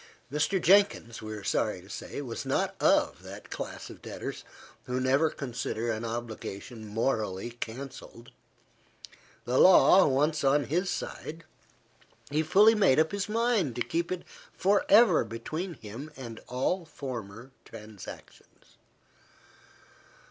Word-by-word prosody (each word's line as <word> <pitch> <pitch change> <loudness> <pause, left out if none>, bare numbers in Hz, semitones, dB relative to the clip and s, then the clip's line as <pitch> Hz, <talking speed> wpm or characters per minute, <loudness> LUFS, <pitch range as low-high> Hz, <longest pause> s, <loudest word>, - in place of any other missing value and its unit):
Mr. 150 +7 +1
Jenkins, 180 - +3
we 110 0 -7
are 105 -2 -7
sorry 105 -1 0
to 90 - -16
say, 140 - -6
was 120 -4 -5
not - - -1
of - - +3
that - - -11
class - - -6
of - - -13
debtors - - -6 0.4
who 125 +1 -2
never 135 +5 +3
consider 120 -4 -3
an 110 +1 -3
obligation 115 -1 -6
morally 110 -2 -1
cancelled. 120 +1 -8 1.1
The 125 +1 +1
law 185 0 +7
once 150 +3 +1
on 140 +2 +3
his 180 +7 -1
side, 165 +2 -5 0.9
he 150 +2 +2
fully 205 +8 +6
made 195 -11 +4
up 160 0 +3
his 200 0 -3
mind 220 - +1
to 120 - 0
keep 170 +1 -2
it 185 -1 -3 0.3
for 200 +2 +2
ever 225 +4 +6
between 155 +10 -5
him 115 +6 -9
and 115 -4 -8
all 135 +9 -1
former 125 -6 -7
transactions. 105 -3 -13
135 Hz, 130 wpm, -29 LUFS, 115-170 Hz, 1.1 s, law